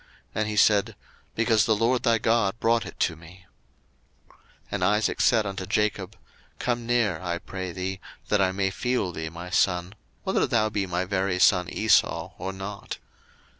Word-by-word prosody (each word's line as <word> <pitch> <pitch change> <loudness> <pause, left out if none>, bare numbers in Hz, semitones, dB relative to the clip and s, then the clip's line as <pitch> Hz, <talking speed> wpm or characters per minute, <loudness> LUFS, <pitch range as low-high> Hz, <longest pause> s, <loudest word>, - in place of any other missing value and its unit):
And 110 -1 -1
he 105 - -3
said, 105 -1 +3 0.4
Because 110 -1 +3
the 110 - +3
LORD 120 +4 +1
thy 115 -1 +3
God 115 -2 +1
brought 115 0 +2
it - - -11
to 85 - +1
me. 85 +4 -15 0.9
01:027:021 - - -25 0.3
And - - -2
Isaac 105 +1 +1
said 110 -3 +4
unto 95 -1 -4
Jacob, 105 -1 -1 0.4
Come 120 -1 -2
near, 110 -8 +1
I 85 -2 -2
pray 95 +1 -6
thee, 95 +2 -4 0.3
that 105 -1 +3
I 95 -1 +3
may 95 0 -1
feel 125 -3 -1
thee, 80 -1 -5
my 85 +2 -9
son, 90 0 +1 0.3
whether - - +1
thou 110 -2 +2
be 100 -2 -2
my 90 +1 -1
very 95 -1 0
son 90 -1 +4
Esau 110 +3 +2
or 95 +2 -3
not. 95 +1 -7
100 Hz, 170 wpm, -26 LUFS, 90-110 Hz, 0.9 s, said